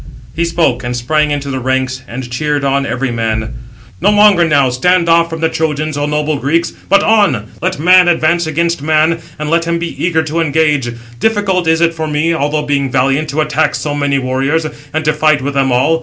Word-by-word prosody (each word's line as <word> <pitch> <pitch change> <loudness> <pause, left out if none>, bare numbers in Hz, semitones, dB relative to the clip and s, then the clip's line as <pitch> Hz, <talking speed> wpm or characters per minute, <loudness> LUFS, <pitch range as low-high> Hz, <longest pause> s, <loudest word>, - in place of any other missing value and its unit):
He 170 - 0
spoke, 165 -7 0
and 120 0 -3
sprang 150 +5 0
into 145 -1 -3
the 130 - -3
ranks, 130 0 -2
and 125 +1 -6
cheered 145 +4 -2
on 140 0 0
every 130 0 -2
man: 110 -1 -2 0.5
"No 195 - +3
longer 205 -3 +5
now 140 -4 +2
stand 175 +7 +1
off 170 0 +3
from 165 -1 -6
the 160 - +3
Trojans, 155 -1 -2
O 145 0 -2
noble 150 0 -1
Greeks, 165 +5 0 0.2
but 200 - +4
on! 195 - +2
let 185 +2 -1
man 180 +2 +5
advance 170 0 +1
against 170 0 -1
man, 155 +2 +1 0.2
and 150 0 -4
let 170 0 +2
him 170 0 -1
be 170 0 -5
eager 160 -2 +1
to 160 +1 -3
engage. 150 -5 +1 0.3
Difficult 205 -5 0
is 160 0 +2
it 170 0 +2
for 160 -1 -4
me, 155 +2 0
although 150 -1 -1
being 140 -2 -1
valiant, 135 +4 0
to 150 +3 -1
attack 150 0 0
so 150 - -3
many 145 -1 0
warriors, 135 +5 -1 0.3
and 155 0 -2
to 155 - +2
fight 155 -1 +2
with 140 +1 -2
them 135 -1 +1
all. 130 +7 +2
155 Hz, 210 wpm, -14 LUFS, 135-165 Hz, 0.5 s, longer